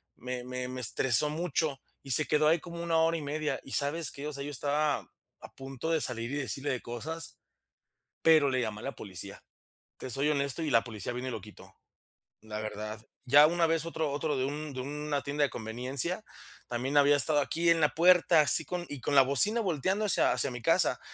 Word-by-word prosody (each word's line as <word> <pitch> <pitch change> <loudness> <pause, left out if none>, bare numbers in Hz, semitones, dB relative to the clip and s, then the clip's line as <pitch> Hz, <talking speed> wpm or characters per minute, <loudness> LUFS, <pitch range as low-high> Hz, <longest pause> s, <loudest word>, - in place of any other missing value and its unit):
Me 125 0 -5
me 125 0 -4
me 130 0 -5
estresó 130 +5 +2
mucho 155 -3 -1 0.2
y 135 - -7
se 155 +4 +3
quedó 150 0 +3
ahí 165 +1 +4
como 170 +1 -8
una 165 -1 +1
hora 165 +1 +3
y - - -5
media, 150 +1 -2
¿y 135 - -12
sabes 150 +2 -1
qué? 140 +2 -7
O 150 - -5
sea, 140 0 -5
yo 145 - -5
estaba 145 +2 0 0.4
a - - -12
punto 135 +3 -6
de 160 -2 +1
salir 120 0 -3
y - - -2
decirle 140 0 -3
de 125 - -3
cosas, 160 +8 -6 0.8
pero 155 -3 +5
le 130 -1 0
llame 110 -2 -4
la 135 - -5
policía, 95 -5 -6 0.6
te 130 - -7
soy 140 +5 0
honesto 140 +2 -1
y 155 - -1
la 115 -2 +4
policía 110 0 -6
vino 125 +1 -4
y - - -3
lo 110 - -5
quitó, 105 +2 -15 0.7
la 105 -1 -6
verdad, 110 0 -6 0.2
ya 145 +4 +7
una 170 0 +2
vez 165 0 0
otro 160 -3 -2
otro 150 +1 -1
de 130 - 0
un 145 +1 -5
de 130 - -4
una 145 +1 -3
tienda 145 +1 -1
de 140 - +2
conveniencia 130 - -1 0.4
también 130 +4 -2
había 145 0 +6
estado 145 +2 +3
aquí 170 +4 0
en 165 -1 +4
la 150 - +4
puerta, 175 -1 +5
así 150 +1 +2
con 180 -1 -4
y 145 - -6
con 145 - -2
la 135 - +9
bocina 140 - +2
volteando 190 +3 0
hacia 205 - +3
hacia 140 - 0
mi 125 - -7
casa. 165 +7 +3
145 Hz, 215 wpm, -30 LUFS, 125-160 Hz, 0.8 s, la